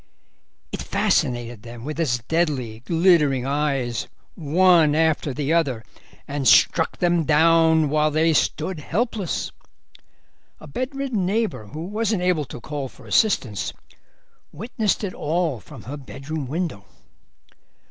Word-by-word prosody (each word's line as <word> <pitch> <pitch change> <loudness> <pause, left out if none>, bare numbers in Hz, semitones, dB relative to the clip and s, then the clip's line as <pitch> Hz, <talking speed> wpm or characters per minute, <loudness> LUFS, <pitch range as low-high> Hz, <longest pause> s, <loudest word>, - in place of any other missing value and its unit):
"It - - -4
fascinated 120 -2 0
them 120 +1 -10
with 155 +2 -5
its 120 -8 0
deadly, 135 -7 -1
glittering 150 -2 +3
eyes, 135 -4 -1 0.3
one 165 -1 +4
after 160 -2 +1
the 145 +3 -1
other, 135 -9 +1 0.4
and 140 -2 -2
struck 160 -1 +4
them 175 -2 +2
down 160 0 +4
while 155 +1 +2
they 160 +2 +2
stood 160 +3 0
helpless. 205 - -2 1.1
A - - -12
bedridden 255 - -3
neighbour, 210 - -1
who 150 +8 -7
wasn't 210 -1 -1
able 175 -5 +1
to 125 - -9
call 140 +1 -5
for - - -17
assistance, 130 - +1 0.8
witnessed 215 - -2
it 195 - -3
all 160 -4 -1
from 95 - -13
her 140 +5 -6
bedroom 140 +2 -6
window." 155 - -3
155 Hz, 125 wpm, -23 LUFS, 135-175 Hz, 1.1 s, one